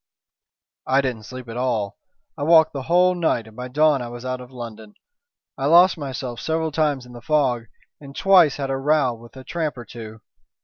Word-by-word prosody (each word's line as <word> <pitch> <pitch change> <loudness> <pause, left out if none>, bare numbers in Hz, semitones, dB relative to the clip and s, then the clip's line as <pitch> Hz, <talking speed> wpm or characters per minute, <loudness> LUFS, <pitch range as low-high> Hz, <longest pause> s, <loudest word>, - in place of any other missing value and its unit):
"I 135 +1 +3
didn't 120 -5 -4
sleep 130 -1 -9
at 115 +1 -7
all. 115 -6 -2 0.4
I - - -9
walked 160 +1 +5
the 140 - -4
whole 180 +5 +3
night, 165 -10 0
and 110 -1 -15
by 125 +1 -6
dawn 150 +1 +2
I 120 - -5
was 120 +1 -9
out 130 0 -3
of 125 - -11
London. 115 -4 -9 0.6
I 135 - 0
lost 175 +4 +6
myself 130 -5 -5
several 160 0 -1
times 150 -4 0
in 125 - -14
the 120 - -10
fog 130 -5 +1 0.3
and 140 -1 -12
twice 185 -7 +5
had 135 -2 -3
a 135 - -1
row 140 -2 +2
with 120 +2 -14
a 130 - -9
tramp 155 -1 -3
or 120 - -8
two. 110 -2 -10
130 Hz, 205 wpm, -22 LUFS, 120-155 Hz, 0.6 s, lost